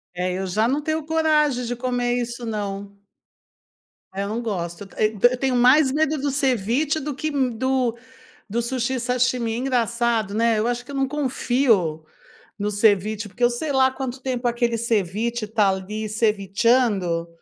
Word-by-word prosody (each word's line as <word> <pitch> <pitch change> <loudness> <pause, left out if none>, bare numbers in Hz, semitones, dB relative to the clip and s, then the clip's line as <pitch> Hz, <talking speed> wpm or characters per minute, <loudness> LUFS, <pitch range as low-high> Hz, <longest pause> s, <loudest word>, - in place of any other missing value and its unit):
É, 180 +1 -1
eu 190 +1 -3
já 210 +5 +1
não 275 +4 +1
tenho 315 +1 -2
coragem 300 -5 +2
de 245 - -3
comer 245 0 -1
isso, 240 0 -5
não. 200 -2 -5 1.1
É, 195 +1 -3
eu 200 - -4
não 225 +3 -2
gosto. 185 -4 -4
Eu 215 0 +1
eu 250 - -2
tenho 265 -1 0
mais 260 +3 +5
medo 310 +1 +1
do 285 +1 -1
ceviche 270 +2 +1
do 295 -2 -4
que 310 +3 -2
do 260 -2 0 0.5
do 225 +4 -1
sushi, 255 +1 -2
sashimi. 250 -1 0
Engraçado, 235 -4 0
né, 230 0 +2
eu 215 - 0
acho 245 0 -2
que 280 - -12
eu - - -7
não 270 -1 0
confio 245 - +1 0.5
no 210 0 -2
ceviche, 210 0 +2
porque 240 +5 -6
eu 240 - +6
sei 265 +6 -3
lá 265 0 +4
quanto 260 -1 -5
tempo 250 -2 -2
aquele 240 -1 0
ceviche 225 +1 -1
tá, 210 -2 +2
ali, 200 +3 -3
cevichando. 205 -4 +1
235 Hz, 165 wpm, -23 LUFS, 210-260 Hz, 1.1 s, eu